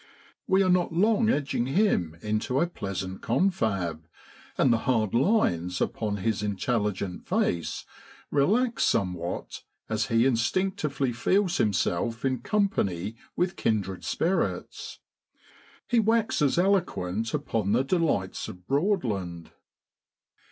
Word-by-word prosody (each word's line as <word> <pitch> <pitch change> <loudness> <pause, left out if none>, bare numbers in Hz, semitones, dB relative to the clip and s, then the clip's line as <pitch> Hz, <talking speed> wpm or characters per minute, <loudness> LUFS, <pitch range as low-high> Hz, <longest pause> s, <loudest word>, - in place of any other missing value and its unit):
We 190 +1 +4
are 185 - +1
not 180 -1 +2
long 215 +6 +3
edging 135 - 0
him 135 - +1
into 110 +5 0
a - - +3
pleasant 95 - -5
confab, 95 - 0 0.5
and 130 - +4
the 115 - +1
hard 110 -5 +1
lines 115 - +2
upon 105 -2 -1
his 105 +1 -1
intelligent 105 -2 -2
face 85 -1 -1 0.5
relax 225 - +2
somewhat 90 -4 -1 0.3
as 110 +2 0
he 115 -1 +3
instinctively 135 +1 0
feels 185 - +1
himself 110 - 0
in 130 -1 0
company 105 - 0 0.2
with 175 0 0
kindred 95 -4 -1
spirits. 180 +4 -2 0.9
He 240 - +3
waxes 220 - +2
eloquent 115 - +1
upon 105 -3 -1
the 125 +3 +3
delights 145 - 0
of 90 0 -10
Broadland. 115 - -1
115 Hz, 110 wpm, -27 LUFS, -, 0.9 s, We